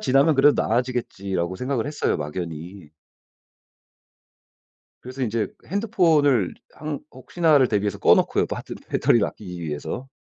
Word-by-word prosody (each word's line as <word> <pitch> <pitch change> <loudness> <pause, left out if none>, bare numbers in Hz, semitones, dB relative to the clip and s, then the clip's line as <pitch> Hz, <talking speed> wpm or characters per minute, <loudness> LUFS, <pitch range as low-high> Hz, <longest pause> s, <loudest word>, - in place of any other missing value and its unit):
지나면 135 +4 +3
그래도 145 +2 +5
나아지겠지.'라고 100 -7 -2
생각을 130 +1 -2
했어요 145 0 -1
막연히. 80 +2 -6 2.1
그래서 130 +2 -7
인제 115 -2 -1 0.2
핸드폰을 160 - +2 0.2
항 150 -2 -5
혹시나를 145 +1 +2
대비해서 105 -1 -1
꺼 - - +6
놓고요 - - +1
또 - - -4
하여튼 - - -7
배터리를 115 -4 +3
아끼기 90 -4 -8
위해서. 80 - -5
125 Hz, 340 characters per minute, -23 LUFS, 95-145 Hz, 2.1 s, 꺼